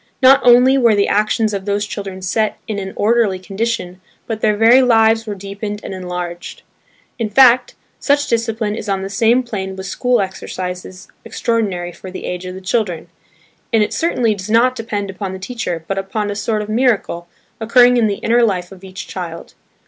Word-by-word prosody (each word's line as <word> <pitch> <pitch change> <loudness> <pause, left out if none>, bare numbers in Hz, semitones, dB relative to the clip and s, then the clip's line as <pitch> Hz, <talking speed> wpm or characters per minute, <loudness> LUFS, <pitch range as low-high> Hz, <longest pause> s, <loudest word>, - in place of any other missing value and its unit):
Not 270 +1 +6
only 250 +2 +6
were 235 -4 +4
the 200 0 +2
actions 215 +1 +1
of 195 -1 -4
those 205 0 -1
children 195 -3 -7
set 215 +4 0
in 215 -3 -3
an 190 -1 -5
orderly 215 -3 +2
condition, 190 -1 -4 0.2
but 220 -1 -4
their 210 -1 +2
very 230 +4 +6
lives 225 -2 +3
were 205 - -3
deepened 200 +2 -6
and - - -6
enlarged. 180 -2 -6 0.6
In 225 -2 -1
fact, 250 +2 +5 0.2
such 285 0 +2
discipline 225 -3 -1
is 210 - -6
on 195 -1 -1
the 195 - -5
same 230 +4 +3
plane 190 -5 -5
with 190 0 -7
school 245 +5 0
exercises 185 -1 -5 0.2
extraordinary 200 -7 -2
for 185 - -11
the 185 - -7
age 180 0 -5
of 185 - -7
the 190 - -9
children; 185 -4 -2 0.6
and 225 -3 +4
it - - -3
certainly 250 -10 +1
does 200 0 -8
not 240 +3 +3
depend 205 -4 -4
upon 190 0 -5
the - - -5
teacher 185 -5 -5
but 195 0 -1
upon 205 +2 -3
a - - -4
sort 215 +1 -1
of - - -8
miracle, 215 -7 0 0.3
occurring 245 +2 +5
in 235 -3 +3
the 200 - -1
inner 235 +1 +3
life 185 -6 0
of 190 -1 -13
each 185 -1 -8
child. 170 -3 -7
210 Hz, 190 wpm, -17 LUFS, 190-230 Hz, 0.6 s, Not